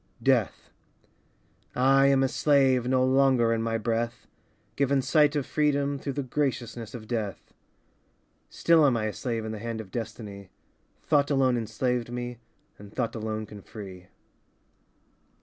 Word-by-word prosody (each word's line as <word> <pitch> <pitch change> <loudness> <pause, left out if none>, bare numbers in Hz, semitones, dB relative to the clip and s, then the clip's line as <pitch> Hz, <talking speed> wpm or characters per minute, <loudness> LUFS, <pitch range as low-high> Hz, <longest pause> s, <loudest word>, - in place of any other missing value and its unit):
Death - - +1 1.0
I 135 +2 +5
am 135 -1 +4
a - - +3
slave 135 -3 +3
No 130 0 +3
longer 130 -3 +3
in 115 - -1
my 115 0 -1
breath. 115 +2 -2 0.5
Given 140 0 +2
sight 150 +3 +3
of 145 -3 0
freedom 145 -2 0
Through 140 0 -4
the 140 - -2
graciousness 125 -5 -3
of 110 -2 -9
death. 110 -5 -4 1.0
Still 165 -2 +4
am 125 -3 +2
I 110 - -1
a 110 - -2
slave 115 -4 -3
In 110 - -4
the 110 - -6
hand 115 0 -4
of 100 -4 -9
destiny, 105 -4 -6 0.5
Thought 145 -2 +2
alone 135 -3 +3
enslaved 120 +1 -2
me 120 -1 -5 0.4
And 100 0 -12
thought 115 0 -2
alone 110 -1 -4
can 105 -1 -11
free. 95 -4 -10
120 Hz, 150 wpm, -27 LUFS, 110-135 Hz, 1.0 s, I